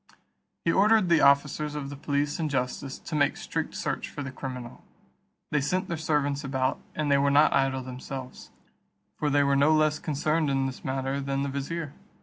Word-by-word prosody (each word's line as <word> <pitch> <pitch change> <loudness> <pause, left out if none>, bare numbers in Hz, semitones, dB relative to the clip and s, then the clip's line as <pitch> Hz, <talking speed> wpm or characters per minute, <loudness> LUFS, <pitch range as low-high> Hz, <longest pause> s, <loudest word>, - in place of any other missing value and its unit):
He 165 - +4
ordered 210 0 +4
the 170 - +5
officers 145 +2 +3
of 140 -2 -4
the - - -6
police 145 +2 -1
and 155 -2 0
justice 130 0 -2
to - - -10
make 145 -1 +2
strict - - -4
search - - -3
for 145 - -6
the 135 - -5
criminal. 125 -2 -7 0.7
They 150 - +2
sent 185 +7 -1
their 170 - -1
servants 150 -2 0
about, 130 -1 -1 0.2
and 150 -2 0
they 140 - +5
were 140 0 +3
not 145 +2 +5
idle 135 -1 +1
themselves, 130 0 -8 0.7
for 150 - -1
they 145 0 +3
were 140 0 +2
no 145 +3 +4
less 155 0 +2
concerned 155 +1 0
in 135 -1 +1
this 130 -1 -5
matter 135 +1 -2
than 135 0 -1
the 140 - -2
vizier. 140 +2 -4
140 Hz, 190 wpm, -27 LUFS, 135-150 Hz, 0.7 s, the